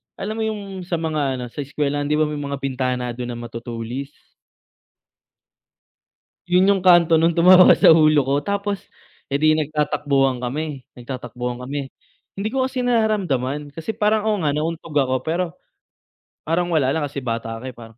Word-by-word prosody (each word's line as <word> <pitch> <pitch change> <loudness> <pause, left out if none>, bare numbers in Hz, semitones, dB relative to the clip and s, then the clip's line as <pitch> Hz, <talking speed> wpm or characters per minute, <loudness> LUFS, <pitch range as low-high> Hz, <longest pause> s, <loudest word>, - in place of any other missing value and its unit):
alam 215 +3 -5
mo - - 0
yung 200 -3 -5
sa 175 - -1
mga 155 -5 -1
ano, 125 -1 -5
sa - - -10
eskwelahan, 145 0 -2
'di 150 - +1
ba 155 - +3
may 150 -1 -3
mga 140 -1 -3
bintana 125 -2 -2
dun 120 +1 -6
na 120 - -5
matutulis. 120 +3 -6 2.4
Yun 180 +2 +4
yung 195 -2 +1
kanto 170 -3 +6
nung 165 +1 +2
tumama 180 +1 +7
sa - - +6
ulo 155 -2 +5
ko. 135 +2 0
Tapos, 200 0 -2 0.5
eh, 140 - -3
'di 155 +1 +4
nagtatakbuhan 145 -3 0
kami, 135 +2 -4
nagtatakbuhan 125 -1 -6
kami, 140 0 -5 0.5
hindi 200 - -2
ko 265 -1 +1
kasi 260 0 -4
nararamdaman 155 - 0
kasi 165 +6 -4
parang, 215 0 +1
oo 215 -1 +1
nga, 150 -3 +1
nauntog 160 0 -4
ako 130 -3 +2
pero, 170 +3 0 1.0
parang 175 +2 0
wala 150 -6 +2
lang, 160 - -1
kasi, 140 -1 -7
bata 115 -1 -3
ka, 120 - -10
eh, - - -23
parang 115 -1 -13
150 Hz, 165 wpm, -21 LUFS, 130-175 Hz, 2.4 s, tumama